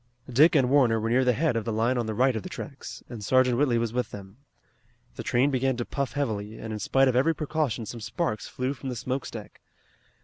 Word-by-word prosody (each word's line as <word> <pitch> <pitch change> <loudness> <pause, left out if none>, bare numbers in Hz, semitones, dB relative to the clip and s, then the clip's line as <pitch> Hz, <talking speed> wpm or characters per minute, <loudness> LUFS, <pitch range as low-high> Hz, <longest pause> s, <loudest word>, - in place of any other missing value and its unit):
Dick 145 +7 +5
and 135 -4 +4
Warner 125 -6 +4
were 115 +1 -1
near 130 +2 +4
the 125 - +4
head 150 +1 +1
of 115 - 0
the 115 - -3
line 115 +4 +1
on 120 -2 -1
the 110 - -3
right 130 +2 +3
of 110 - -2
the - - -8
tracks, - - -8
and 115 -4 -8
Sergeant 130 +2 +3
Whitley 130 -5 +3
was 115 -1 -1
with 125 0 -1
them. 100 +1 -10 0.8
The - - -5
train 130 +4 +2
began 130 -1 0
to 120 - -2
puff 140 -3 -3
heavily, 110 -7 -3
and 110 -1 -6
in 105 - -4
spite 135 +6 +3
of 130 - +1
every 155 +6 +3
precaution 150 -7 -2
some 115 +2 -7
sparks 110 -2 -2
flew 130 +2 -2
from 135 0 -7
the 125 - -4
smoke 130 +2 -3
stack. 110 -3 -10
125 Hz, 240 wpm, -27 LUFS, 115-135 Hz, 0.8 s, Dick